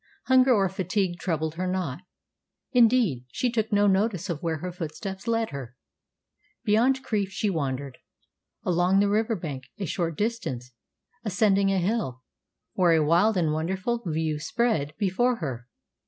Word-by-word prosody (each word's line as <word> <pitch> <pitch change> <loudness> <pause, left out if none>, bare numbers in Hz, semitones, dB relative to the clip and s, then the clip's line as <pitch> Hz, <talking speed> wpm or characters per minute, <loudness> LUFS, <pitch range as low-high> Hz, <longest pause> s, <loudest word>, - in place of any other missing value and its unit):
Hunger 260 0 +5
or 200 -5 +4
fatigue 190 -1 -1
troubled 160 -3 -1
her 180 +3 -3
not. 180 -7 -2 0.7
Indeed, 230 - +3
she 245 - 0
took 220 -1 -1
no 205 0 +4
notice 195 -2 +1
of 155 - -5
where 165 -2 -1
her 180 +4 -5
footsteps 185 +5 -6
led 230 -1 0
her. 130 -3 -7 0.9
Beyond 250 +5 +3
Crieff 205 -3 -1
she 200 +2 -1
wandered, 140 -4 -3 0.6
along 180 +2 +3
the 200 0 +3
river 220 +2 +1
bank 145 -8 -6
a 200 - -3
short 165 -1 -2
distance, 135 - -3 0.5
ascending 200 -1 +2
a 195 - +1
hill, 180 - -1 0.5
where 180 -3 +4
a 160 -2 +3
wild 180 +7 +3
and 160 -4 +1
wonderful 190 +9 -1
view 160 -2 -1
spread 160 -7 0
before 240 +6 +1
her. 130 - -5
185 Hz, 150 wpm, -26 LUFS, 160-215 Hz, 0.9 s, Hunger